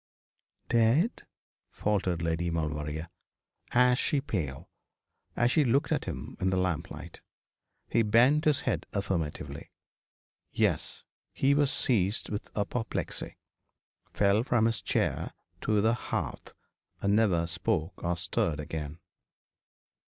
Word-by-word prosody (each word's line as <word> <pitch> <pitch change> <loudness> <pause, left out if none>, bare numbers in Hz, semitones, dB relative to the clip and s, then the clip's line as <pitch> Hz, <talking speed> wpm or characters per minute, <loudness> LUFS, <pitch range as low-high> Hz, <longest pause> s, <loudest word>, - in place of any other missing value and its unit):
'Dead?' 120 - +2 0.4
faltered 95 -5 0
Lady 80 +1 0
Maulevrier, 75 -1 -2 0.6
ashy 125 +3 +3
pale, 85 - -3 0.7
as 120 +1 +3
she 155 - +4
looked 135 +2 +2
at - - +1
him - - -6
in 95 - +1
the 95 - +1
lamplight. 90 -4 -3 0.7
He 115 - +2
bent 120 +8 +4
his 150 -3 +3
head - - -1
affirmatively. 80 -7 -3 0.8
'Yes. - - 0 0.3
He 135 +1 +3
was 145 -1 +3
seized 105 -4 +1
with 105 - -4
apoplexy 110 +3 -3 0.7
fell 100 +1 +3
from 120 -2 +2
his 115 0 0
chair - - 0 0.3
to 105 -1 +2
the 110 +2 +3
hearth, 120 - -4 0.5
and 100 +1 +2
never 95 -7 +3
spoke 90 0 -2
or 85 0 0
stirred 85 -3 0
again.' 75 0 -5
100 Hz, 115 wpm, -29 LUFS, 85-120 Hz, 0.8 s, she